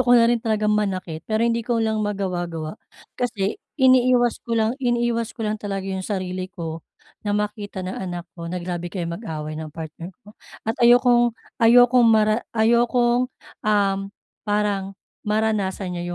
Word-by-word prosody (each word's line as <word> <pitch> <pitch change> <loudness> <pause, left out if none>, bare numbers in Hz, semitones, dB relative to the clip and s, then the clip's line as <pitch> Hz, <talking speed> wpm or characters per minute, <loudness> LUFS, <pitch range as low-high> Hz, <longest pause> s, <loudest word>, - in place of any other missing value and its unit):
ko 245 -1 +5
na 230 - +6
rin 235 0 +2
talagang 215 -2 +1
manakit. 185 -6 -1
Pero 220 +1 +1
hindi 235 0 +1
ko 235 +1 -1
lang 220 -1 0
magawa-gawa. 180 -5 -3 0.4
Kasi 210 -5 -1 0.2
iniiwas 255 -2 +4
ko 230 -1 -2
lang 220 0 +2
iniiwas 240 -2 0
ko 225 - -3
lang 215 0 -2
talaga 195 -2 -4
'yong 190 -1 -3
sarili 185 -2 -3
ko 165 -4 -6 0.4
na 205 - -1
makita 210 -2 -4
ng 185 - -5
anak 175 -1 -5
ko 170 -1 -7
na 180 - -3
grabe 175 0 -4
kaming 170 -3 -3
mag-away 155 -8 -5
ng 160 -1 -5
partner 165 +1 -7 0.2
ko 210 - -14 0.3
at 225 - 0
ayokong 240 0 +5 0.3
ayokong 245 +1 +6
mara 215 0 +4 0.2
ayokong, 240 +2 +3 0.4
um, 200 -2 +2 0.5
parang 205 -2 0 0.3
maranasan 210 -3 0
niya 175 0 -4
210 Hz, 155 wpm, -23 LUFS, 185-235 Hz, 0.5 s, na